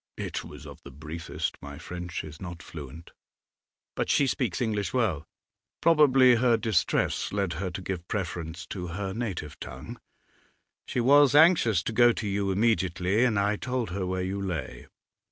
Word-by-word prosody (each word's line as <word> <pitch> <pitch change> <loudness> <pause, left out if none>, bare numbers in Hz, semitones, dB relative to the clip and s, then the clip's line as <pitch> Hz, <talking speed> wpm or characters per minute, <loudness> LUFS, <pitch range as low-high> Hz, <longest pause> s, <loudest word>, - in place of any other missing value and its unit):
'It - - -4
was - - -11
of - - -11
the - - -11
briefest; 80 +4 -5
my 70 0 -8
French 90 +1 -6
is 75 0 -10
not 85 -2 -7
fluent.' 75 +1 -10 0.8
'But - - -2
she 140 - +4
speaks 125 -6 -1
English 110 -2 -1
well.' 95 - 0 0.5
'Probably 135 -6 +5
her 120 -1 +3
distress 105 -9 0
led 100 -4 -1
her 95 - -2
to 90 +1 -7
give 90 -2 -5
preference 85 -4 -4
to 90 -3 -5
her 95 -2 -3
native 100 - -5
tongue. - - -8 0.9
She 125 - -1
was 140 +2 +5
anxious 150 - +5
to 115 - -3
go 120 +1 +6
to 110 - -4
you 100 0 -1
immediately, 95 0 +1
and 110 -5 +2
I 105 +1 +1
told 125 -5 -3
her 95 0 -3
where 95 0 -2
you 95 +2 -3
lay. 80 -9 -5
100 Hz, 165 wpm, -27 LUFS, 85-120 Hz, 0.9 s, go